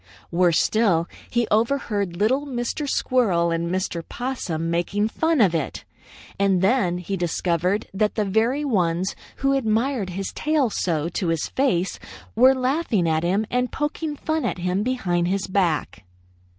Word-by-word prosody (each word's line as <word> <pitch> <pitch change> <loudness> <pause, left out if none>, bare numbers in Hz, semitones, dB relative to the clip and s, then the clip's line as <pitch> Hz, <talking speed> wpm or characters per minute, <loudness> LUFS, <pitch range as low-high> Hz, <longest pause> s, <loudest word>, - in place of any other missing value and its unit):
Worse 175 -1 +3
still, 190 -7 +2 0.2
he 235 -1 +1
overheard 215 -6 0
little 260 +9 +1
Mr. 260 +3 -3
Squirrel 190 -13 +2
and 165 0 -1
Mr. 180 -2 -2
Possum 180 -11 -3
making 200 +5 0
fun 320 +4 +1
of 195 -7 +4
it. 160 -4 -3 0.5
And 195 -2 +2
then 190 -5 +2
he 180 +2 -4
discovered 175 +2 0
that 210 +2 0
the 215 - 0
very 230 +9 +1
ones 185 -6 0 0.2
who 275 0 +1
admired 230 -3 0
his 195 +2 -4
tail 300 -6 +1
so 160 -5 -1
to 175 +1 -2
his 165 -1 -1
face 195 -10 0 0.4
were 260 +4 +6
laughing 255 - 0
at 160 0 +1
him 190 +6 +1
and 250 0 0
poking 295 +1 -3
fun 315 +2 -2
at - - -1
him 180 +2 -1
behind 185 -8 0
his 195 +1 0
back. 180 - -1
200 Hz, 150 wpm, -23 LUFS, 175-255 Hz, 0.5 s, were